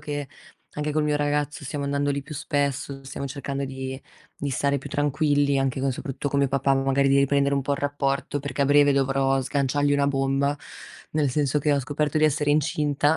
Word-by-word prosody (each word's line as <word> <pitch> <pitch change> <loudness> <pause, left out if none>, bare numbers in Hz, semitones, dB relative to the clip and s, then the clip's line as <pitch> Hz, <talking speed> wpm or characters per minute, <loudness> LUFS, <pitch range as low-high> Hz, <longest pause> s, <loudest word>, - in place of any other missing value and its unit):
che, 145 -2 -4 0.5
anche 150 0 -2
col 155 0 +1
mio 150 -1 +1
ragazzo 145 0 -1
stiamo 140 +1 -4
andando 140 0 0
lì 140 0 -1
più 155 +2 -9
spesso, 140 -1 -2
stiamo 140 +1 -5
cercando 140 0 -4
di 130 0 -5 0.4
di 140 - -2
stare 140 +2 +1
più - - -9
tranquilli, 145 -1 +2
anche 135 -1 0
co 135 0 +1
soprattu 135 +2 -4
con 140 - 0
mio 140 - +2
papà, 135 0 +2
magari 135 +1 +2
di 140 - +4
riprendere 140 0 +2
un 140 - 0
po' 140 - -1
il 140 - -1
rapporto, 145 0 -1
perché 140 0 -2
a - - +3
breve 145 0 +5
dovrò 135 0 +2
sganciargli 145 +2 0
una 140 0 +2
bomba, 135 +1 +1 0.6
nel 150 -3 +1
senso 145 +1 +1
che 145 +1 +1
ho 140 - +2
scoperto 150 +3 -1
di 155 - +3
essere 150 0 +2
incinta. 150 0 +2
140 Hz, 205 wpm, -25 LUFS, 135-145 Hz, 0.6 s, breve